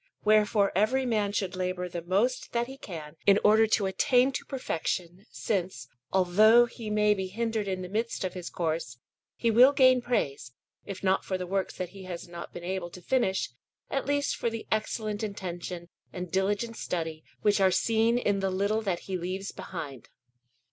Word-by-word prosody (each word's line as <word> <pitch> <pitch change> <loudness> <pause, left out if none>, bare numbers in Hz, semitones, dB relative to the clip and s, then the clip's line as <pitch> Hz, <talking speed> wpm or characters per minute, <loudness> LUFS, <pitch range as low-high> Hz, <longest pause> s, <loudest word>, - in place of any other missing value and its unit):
Wherefore 210 -1 +4
every 245 +7 +2
man 210 -4 +1
should 195 -2 -2
labour 180 0 -2
the 175 -1 -5
most 205 +9 0
that 235 0 +1
he 265 +2 -9
can 160 - -9
in 200 0 +7
order 220 +1 +6
to 215 -2 +2
attain 250 +7 +3
to - - -4
perfection, 185 - -3
since, 180 - -3 0.2
although 210 +6 +6
he 230 -2 -8
may 210 0 +3
be 190 -2 -3
hindered 220 +1 -2
in 185 -1 -2
the - - -5
midst 220 +4 -2
of 185 - -2
his 180 -2 -6
course, 160 -7 -2 0.4
he 230 - +1
will 250 +5 +7
gain 255 -2 +5
praise, 140 - -2 0.3
if 195 -1 -7
not 190 0 +2
for 190 - -2
the 180 - -4
works 190 +1 -2
that 180 -2 -3
he 195 0 -11
has 175 -2 -6
not 170 0 -8
been 175 - -8
able 180 -1 -3
to 180 - -11
finish, 190 - 0 0.4
at 275 - -1
least 285 0 +1
for 235 - -1
the 225 -1 -6
excellent 215 -1 -1
intention 180 -4 -5 0.2
and 180 -2 -6
diligent 205 +4 0
study 160 -3 -3 0.2
which 205 -1 +3
are 190 - +6
seen 225 +4 +2
in 205 -5 +1
the 195 0 0
little 200 +4 0
that 190 -5 -2
he 185 -2 -4
leaves 185 +3 -4
behind. 145 -8 -7
195 Hz, 185 wpm, -28 LUFS, 180-225 Hz, 0.4 s, in